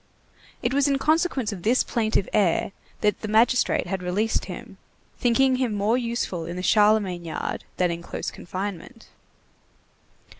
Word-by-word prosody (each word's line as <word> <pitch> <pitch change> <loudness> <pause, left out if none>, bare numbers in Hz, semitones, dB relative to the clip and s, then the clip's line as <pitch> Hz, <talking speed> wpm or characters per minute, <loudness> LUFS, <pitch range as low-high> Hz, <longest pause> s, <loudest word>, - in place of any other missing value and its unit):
It 240 - 0
was 280 +1 +3
in 275 -1 +2
consequence 310 -5 +1
of 195 -4 -7
this 235 +7 +3
plaintive 220 -4 0
air 195 -3 +2 0.3
that 210 0 +1
the 220 - -4
magistrate 230 +4 +3
had 190 +1 -3
released 200 +5 0
him, 200 0 -9 0.4
thinking 255 +2 +3
him 250 -5 0
more 205 +3 +2
useful 230 -9 -2
in 170 - -5
the 180 - -5
Charlemagne 205 -4 +3
yard 165 - -4
than 180 -1 +2
in 170 0 -4
close - - -5
confinement. 195 +5 -7
215 Hz, 150 wpm, -25 LUFS, 185-245 Hz, 0.4 s, was